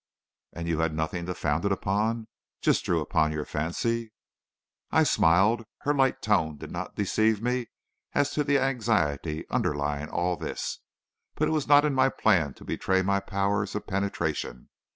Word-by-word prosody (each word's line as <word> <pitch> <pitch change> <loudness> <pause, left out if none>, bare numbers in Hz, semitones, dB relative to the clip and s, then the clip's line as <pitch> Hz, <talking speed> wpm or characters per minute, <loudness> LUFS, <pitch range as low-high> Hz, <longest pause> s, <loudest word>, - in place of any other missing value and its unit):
"And 85 0 -5
you 80 -2 0
had 80 -1 0
nothing 85 +2 -2
to 90 - -3
found 80 +2 -1
it 100 - +1
upon? 110 +4 0 0.3
Just - - +2
drew - - +1
upon 80 -1 +1
your 75 -1 -3
fancy?" 110 +9 -2 0.8
I - - +4
smiled. 100 +8 +3 0.2
Her 145 - +1
light 135 -2 +1
tone 80 -8 +1
did - - -9
not - - -5
deceive 110 +1 +2
me 125 +1 -1 0.5
as 145 0 +2
to 150 - 0
the 140 0 +3
anxiety 105 - 0
underlying 75 0 -1
all 90 0 0
this; - - -4 0.6
but - - +1
it - - 0
was 155 -3 0
not 145 +1 +6
in 150 - +1
my 135 0 +4
plan 85 - +2
to - - -14
betray 95 0 0
my 100 +1 +2
powers 100 +1 -1
of 105 - -3
penetration. 100 - -3
100 Hz, 170 wpm, -27 LUFS, 80-115 Hz, 0.8 s, not